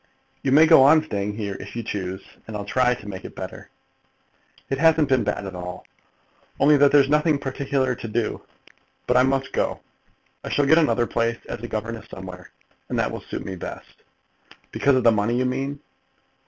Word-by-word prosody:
"You 135 Hz, -, -1 dB
may 155 Hz, +4 st, +7 dB
go 160 Hz, -4 st, +7 dB
on 155 Hz, +3 st, +6 dB
staying 105 Hz, -7 st, -3 dB
here, 100 Hz, -3 st, -4 dB
if 100 Hz, -, -9 dB
you 115 Hz, -, -3 dB
choose, 95 Hz, -3 st, -4 dB, 0.2 s
and 110 Hz, -1 st, -5 dB
I'll 100 Hz, -, -6 dB
try 125 Hz, +3 st, +2 dB
to 105 Hz, -, -13 dB
make 95 Hz, -2 st, -7 dB
it -, -, -10 dB
better." -, -, -8 dB, 1.0 s
"It 135 Hz, -, -2 dB
hasn't 160 Hz, -2 st, +4 dB
been 130 Hz, -3 st, +3 dB
bad 105 Hz, 0 st, -2 dB
at 95 Hz, -, -6 dB
all, 90 Hz, 0 st, -7 dB, 0.7 s
only 150 Hz, +2 st, +5 dB
that 145 Hz, 0 st, +5 dB
there's 140 Hz, -2 st, +5 dB
nothing 150 Hz, +1 st, +2 dB
particular 135 Hz, -1 st, -1 dB
to 115 Hz, -1 st, -7 dB
do. 115 Hz, 0 st, -2 dB, 0.6 s
But 125 Hz, -, +1 dB
I -, -, +6 dB
must 135 Hz, 0 st, 0 dB
go. -, -, -1 dB, 0.6 s
I -, -, -5 dB
shall 145 Hz, -, +1 dB
get 160 Hz, +4 st, +5 dB
another 150 Hz, -7 st, +2 dB
place 115 Hz, 0 st, -1 dB
as -, -, -5 dB
a 120 Hz, -, -5 dB
governess 110 Hz, 0 st, -5 dB
somewhere, 90 Hz, -1 st, -10 dB, 0.4 s
and -, -, -2 dB
that -, -, 0 dB
will -, -, -6 dB
suit -, -, -7 dB
me 95 Hz, -, -5 dB
best." 90 Hz, -, -9 dB, 0.7 s
"Because 140 Hz, 0 st, +2 dB
of 130 Hz, -, +1 dB
the 115 Hz, -, +6 dB
money, 110 Hz, +2 st, 0 dB
you 130 Hz, -, +1 dB
mean." 135 Hz, +3 st, -2 dB
125 Hz, 195 wpm, -23 LUFS, 105-140 Hz, 1.0 s, may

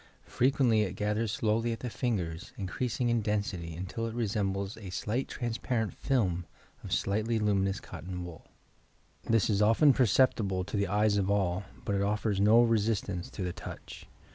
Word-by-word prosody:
Frequently 125 Hz, -4 st, +2 dB
it 95 Hz, -4 st, -1 dB
gathers 105 Hz, +2 st, -1 dB
slowly 115 Hz, 0 st, 0 dB
at 115 Hz, -, -5 dB
the 125 Hz, -, -3 dB
fingers, 90 Hz, -11 st, -3 dB
increasing 120 Hz, +5 st, -2 dB
in 120 Hz, -1 st, +2 dB
density 95 Hz, -6 st, -2 dB
till 115 Hz, +4 st, -3 dB
it 115 Hz, -, -6 dB
resembles 100 Hz, -3 st, -1 dB
a 100 Hz, -4 st, -9 dB
slight 110 Hz, +7 st, -2 dB
transparent 120 Hz, -2 st, -2 dB
film 95 Hz, -11 st, 0 dB, 0.4 s
of -, -, -8 dB
slightly 110 Hz, +3 st, 0 dB
luminous 100 Hz, -2 st, +1 dB
eotton 90 Hz, 0 st, -7 dB
wool. 85 Hz, -3 st, -10 dB, 0.8 s
This 115 Hz, -3 st, +3 dB
is 105 Hz, -2 st, +1 dB
often 115 Hz, +7 st, +5 dB
perceptible 110 Hz, -6 st, +2 dB
to 90 Hz, -, -6 dB
the 100 Hz, -1 st, +1 dB
eyes 105 Hz, +2 st, +2 dB
of 100 Hz, -1 st, +1 dB
all, 95 Hz, -1 st, +1 dB, 0.2 s
bat 100 Hz, -, 0 dB
it -, -, 0 dB
offers 105 Hz, 0 st, 0 dB
no 110 Hz, +4 st, +6 dB
resistance 105 Hz, -5 st, 0 dB
to 100 Hz, -, -5 dB
the 90 Hz, -1 st, -2 dB
touch. -, -, -9 dB
105 Hz, 165 wpm, -30 LUFS, 95-115 Hz, 0.8 s, no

